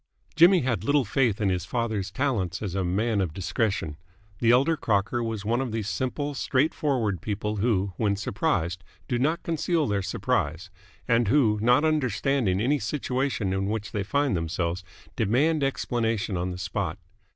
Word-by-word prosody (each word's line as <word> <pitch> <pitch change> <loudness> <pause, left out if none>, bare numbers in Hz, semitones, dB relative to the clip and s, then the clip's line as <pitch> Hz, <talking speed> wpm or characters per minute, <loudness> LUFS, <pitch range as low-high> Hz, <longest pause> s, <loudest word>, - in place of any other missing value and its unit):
Jimmy 175 +3 +6
had 120 -7 -1
little 145 +2 +2
faith 115 -1 +1
in 105 -3 +1
his 90 -2 -1
father's 105 0 -2
talents 105 - -1
as 95 -4 -3
a 95 0 0
man 100 +4 0
of 85 -5 -3
discretion. 95 -5 -1 0.4
The 115 - +2
elder 135 +7 +4
Crocker 105 -1 0
was 110 -2 -4
one 120 +4 +1
of 130 -3 -3
those 110 -2 -2
simple, 145 +5 -2
straight 140 +2 +1
forward 115 - -1
people 105 +1 -3
who, 100 -3 +1
when 105 -3 +1
surprised, 95 -5 -1 0.2
do 120 - 0
not 155 +6 0
conceal 165 0 0
their 100 -2 0
surprise, 85 0 -2 0.4
and 115 -2 +3
who, 110 -4 +3
not 125 +6 +4
understanding 130 -7 +1
any 140 +7 +2
situation 125 -3 -1
in 95 0 -1
which 105 0 -3
they 105 - -2
find 140 +4 0
themselves, 85 +1 -2 0.3
demand 140 +9 +2
explanation 115 -6 -1
on 90 +1 -1
the 90 - -5
spot. - - -3
110 Hz, 165 wpm, -26 LUFS, 95-130 Hz, 0.4 s, Jimmy